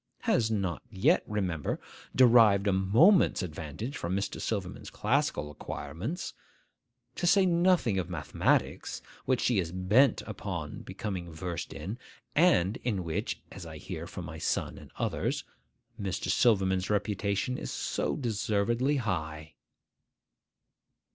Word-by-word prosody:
Has 110 -2 +2
not 100 -6 -1
yet, 95 - +3
remember, 95 -8 -2 0.4
derived 115 -6 +6
a 100 - +3
moment's 115 - +5
advantage 80 - -5
from 85 -4 -2
Mr. 100 +1 -2
Silverman's 100 -5 -3
classical 115 - 0
acquirements. 85 - -5 0.8
To 175 - 0
say 195 +1 +5
nothing 170 - +3
of 90 -1 -3
mathematics, 85 -5 0 0.2
which 130 -1 +1
she 120 -5 +2
is 85 -3 -2
bent 105 +8 +3
upon 90 -7 -5
becoming 90 -5 -5
versed 85 +1 -5
in, 95 - -6 0.4
and 120 - +4
in 105 -7 -2
which 85 +6 -3
(as - - -8
I - - -8
hear - - -6
from - - -7
my - - -7
son - - -1
and - - -13
others) - - -1 0.6
Mr. 95 -2 -2
Silverman's 95 -5 +3
reputation 105 +3 0
is - - -5
so - - -1
deservedly 120 +2 0
high! 80 - -3
100 Hz, 125 wpm, -30 LUFS, 90-120 Hz, 0.8 s, derived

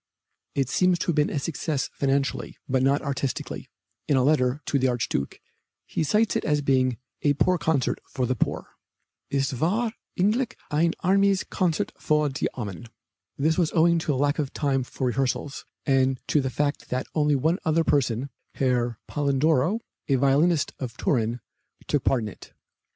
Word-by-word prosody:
It 135 -2 +1
seems 180 +5 +3
to - - -3
have 170 - +2
been 150 -1 +3
a - - -2
success 145 -1 -2
financially, 135 -2 -1
but 130 0 +1
not 135 +2 +2
artistically. 140 -2 -3 0.4
In 140 - +3
a 130 - +3
letter 135 -2 +2
to 140 - +1
the 130 - +2
Archduke 120 - -2 0.5
he - - -2
cites 210 +9 +2
it - - 0
as 150 -1 +1
being 130 -3 +2 0.2
"a 145 - +3
poor 180 +4 +2
concert 150 -4 +1
for 130 -2 -1
the 130 - +1
poor." 120 - -2 0.6
"Es 135 0 0
war 200 - 0 0.3
eigentlich 235 +7 +1 0.2
ein 165 +3 +2
armes 195 +1 +3
Koncert 175 -4 -1
für 150 -2 +1
die 130 - 0
Armen." 105 -2 -6 0.5
This 160 +4 +2
was 165 -3 +2
owing 170 0 +4
to 150 -3 -1
lack 145 +3 +1
of 145 -3 -1
time 140 -3 +1
for 130 +1 -4
rehearsals, 135 +3 -1 0.2
and 135 -1 +2
to 150 - +3
the 130 - -1
fact 145 +3 -2
that 130 0 -1
only 150 -2 +2
one 160 +7 +1
other 165 0 +2
person, 130 -2 +1 0.2
Herr 120 -3 +1
Polledro, 145 - +1 0.3
a 140 - +3
violinist 140 +5 +3
of 125 -4 -5
Turin, 120 -2 0 0.4
took 145 -3 0
part 125 -4 +2
in 105 - -3
it. - - -14
140 Hz, 170 wpm, -25 LUFS, 130-160 Hz, 0.6 s, owing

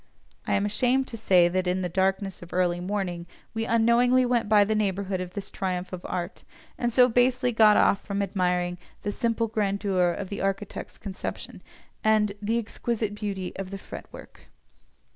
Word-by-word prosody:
I - - +2
am 200 - +1
ashamed 250 +5 +1
to - - -6
say 185 -6 +4
that 185 +1 -1
in 185 +1 0
the - - 0
darkness 190 +2 -1
of 175 - -11
the - - -8
early 175 -1 +1
morning 180 -2 -3 0.3
we 225 0 -2
unknowingly 235 +3 +4
went 240 -3 +1
by 210 -1 +6
the 215 +2 0
neighbourhood 195 -2 -1
of 180 0 -6
this 200 - -5
triumph 185 -1 -3
of 180 - -6
art, 180 0 -4 0.3
and 240 -1 -1
so 250 +1 +6
basely 250 +1 +2
got 220 -2 +6
off 200 - +4
from 200 0 -2
admiring 180 -2 -1 0.2
"the 205 - -1
simple 230 +1 0
grandeur 200 -4 +1
of 185 +2 -4
the 200 - -4
architect's 195 +1 -3
conception," 195 -2 -6 0.4
and 215 -1 +3
"the 220 +3 0
exquisite 230 -1 -2
beauty 200 -3 -4
of 195 -1 -5
the 195 - -5
fretwork." - - -11
200 Hz, 180 wpm, -26 LUFS, 185-225 Hz, 0.4 s, by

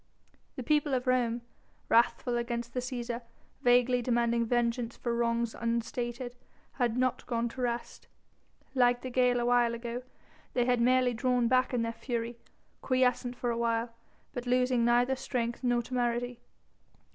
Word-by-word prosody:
The 255 - -5
people 295 +1 +2
of 250 0 -2
Rome, 245 -2 +1 0.5
wrathful 235 +1 +3
against 235 0 -3
the 255 - -1
Cæsar, 245 -1 -4 0.4
vaguely 245 0 +4
demanding 235 -1 +1
vengeance 235 0 0
for 235 - -2
wrongs 235 -1 0
unstated, 240 +1 -3 0.4
had 240 -2 0
not 255 0 +1
gone 235 0 0
to 255 - -7
rest. 240 -1 -3 0.7
Like 245 -2 +3
the 255 - -5
gale 250 -1 +3
a 240 - 0
while 240 -1 +3
ago 235 +1 -5 0.5
they 245 -1 +2
had 245 -1 +2
merely 255 0 +3
drawn 245 0 +1
back 255 +1 +3
in 245 -2 0
their 230 0 -2
fury, 235 0 -4 0.4
quiescent 250 -1 +1
for 245 -1 -1
a 230 - -2
while, 230 0 0 0.4
but 245 0 -5
losing 250 -1 +2
neither 245 +2 +3
strength 240 -2 -3
nor 245 -1 +2
temerity. 245 0 -1
245 Hz, 150 wpm, -30 LUFS, 235-250 Hz, 0.7 s, vaguely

